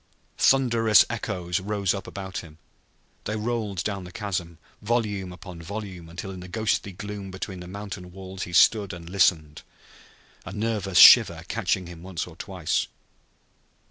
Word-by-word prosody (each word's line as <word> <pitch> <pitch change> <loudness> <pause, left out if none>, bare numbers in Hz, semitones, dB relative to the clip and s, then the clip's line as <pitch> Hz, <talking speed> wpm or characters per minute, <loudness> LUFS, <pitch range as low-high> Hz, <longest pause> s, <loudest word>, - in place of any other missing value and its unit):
Thunderous 115 -5 +5
echoes 90 -6 -2
rose 100 -1 -1
up 100 - -6
about 95 -2 -6
him. 80 -2 -12 0.7
They 105 - -2
rolled 110 -5 -2
down 100 -2 -3
the 90 - -10
chasm, 90 -4 -4 0.2
volume 105 -4 -1
upon 90 -1 -10
volume, 95 -2 -7
until 90 +3 -7
in 95 - -8
the 90 - -9
ghostly 105 0 -1
gloom 100 +1 -7
between 95 0 -6
the 90 - -9
mountain 95 -2 -7
walls 95 0 -9
he 90 - -5
stood 100 +2 +4
and 85 -1 -9
listened, 85 -5 +2 0.8
a - - -8
nervous 105 -3 -1
shiver 85 -10 +9
catching 95 -4 -1
him 85 -1 -10
once 90 -1 -4
or - - -13
twice. - - -2
95 Hz, 150 wpm, -25 LUFS, 90-105 Hz, 0.8 s, shiver